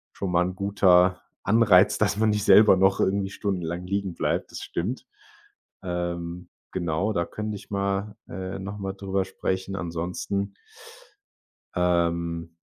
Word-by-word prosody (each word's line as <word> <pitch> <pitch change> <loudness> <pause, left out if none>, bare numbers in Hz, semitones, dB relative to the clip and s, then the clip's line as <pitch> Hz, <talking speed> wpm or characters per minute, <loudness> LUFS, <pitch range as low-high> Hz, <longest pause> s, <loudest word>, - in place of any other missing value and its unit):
schon 95 -2 -3
mal 90 0 +3
'n 90 - -4
guter 95 -2 +3 0.2
Anreiz, 100 -3 +5
dass 100 -1 +1
man 110 0 +3
nicht 105 -1 0
selber 105 -2 +7
noch 95 +1 +3
irgendwie 95 0 +1
stundenlang 90 -3 -3
liegenbleibt. 100 -2 -2
Das - - -6
stimmt. 105 +10 -4 0.8
Ähm, 85 0 -4 0.2
genau, 90 +4 -1
da 85 -3 0
könnte 105 0 -5
ich 100 - -11
mal 100 +1 -1
äh, 95 +2 -5
noch 100 +2 -6
mal 95 -1 -4
drüber 95 -1 -2
sprechen. 95 0 -3
Ansonsten 90 +3 -3 1.2
Ähm. 85 -1 0
95 Hz, 135 wpm, -25 LUFS, 90-100 Hz, 1.2 s, selber